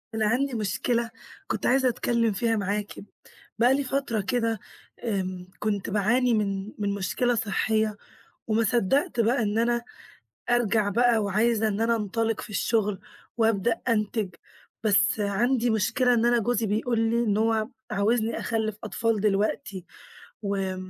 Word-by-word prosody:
أنا 220 -1 +1
عندي 260 +4 +1
مشكلة 230 +2 -1 0.4
كنت - - -3
عايزة 260 0 +4
أتكلم 235 -1 +1
فيها 225 +3 +1
معاكِ. 205 0 -2 0.7
بقى 245 +3 +5
لي 280 - +1
فترة 270 -5 -1
كده 225 +2 -1 0.4
آمم 185 -5 -3
كنت 205 -2 -2
باعاني 235 +5 +2
من 200 -1 -1
من 200 -1 0
مشكلة 235 +5 0
صحية 215 0 0 0.5
وما 225 +1 +2
صدّقت 245 - +1
بقى 235 +2 +2
إن 210 0 0
أنا 235 +1 +1 0.7
أرجع 225 -3 +2
بقى 235 +3 +3
وعايزة 220 +2 +2
إن 210 0 -1
أنا 230 +1 +2
أنطلّق 225 +1 -1
في - - -9
الشغل، 210 -1 0 0.4
وأبدأ 225 0 +1
أنتج. 215 -3 0 0.5
بس 210 0 +3
عندي 235 +5 +1
مشكلة 235 +4 +2
إن 230 0 +2
أنا 240 0 +4
جوزي 230 0 0
بيقول 225 +3 0
لي 230 +1 +2
إن 210 -3 +1
هو 220 0 +1 0.2
عاوزني 220 +2 +1
أخلف 220 -2 -1
أطفال 225 0 0
دلوقتي، 200 -2 -1 0.6
و 195 -2 -1
220 Hz, 140 wpm, -26 LUFS, 205-235 Hz, 0.7 s, بقى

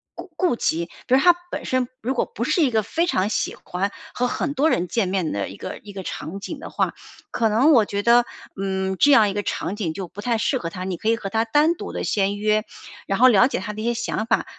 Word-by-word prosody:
顾 - - -9
顾 360 -8 +2
及。 170 -6 0 0.2
比 255 - +1
如 - - +5
他 355 +3 +7 0.2
本 - - -4
身 255 -1 0
如 250 +4 -1
果 250 - 0
不 230 - -5
是 340 - +2
一 280 - +3
个 220 -1 +2
非 330 - 0
常 190 - +1
喜 - - -1
欢 195 +2 -2 0.2
和 250 - 0
很 280 +4 -2
多 290 +3 +2
人 180 - 0
见 225 -5 0
面 185 -5 -1
的 100 -1 -2
一 95 - -9
个 - - -7
一 205 - -10
个 195 - -6
场 165 +3 -6
景 295 +10 -6
的 325 - -8
话， - - -1 0.4
可 225 -2 +1
能 250 +9 +4
我 230 - +6
觉 200 0 -3
得， 235 +1 +5 0.4
嗯， 190 0 -1
这 290 +1 +6
样 220 -6 +6
一 - - -3
个 205 - -1
场 195 - -3
景 185 -7 -3
就 190 +1 -5
不 180 +5 -9
太 230 +1 0
适 260 +4 +1
合 165 - -4
他， 180 +2 -6
你 190 - -2
可 220 - -1
以 230 - +4
和 200 -4 -5
他 220 +3 +1
单 295 +8 +3
独 - - -7
地 - - -4
先 200 0 0
约， 215 +1 +1 0.4
然 195 - -1
后 255 - +8
了 240 +1 +6
解 275 - -2
他 210 +2 -5
的 215 - -6
一 - - -4
些 240 - +1
想 235 -2 -2
法， 225 - +1
215 Hz, 290 characters per minute, -23 LUFS, 195-250 Hz, 0.4 s, 后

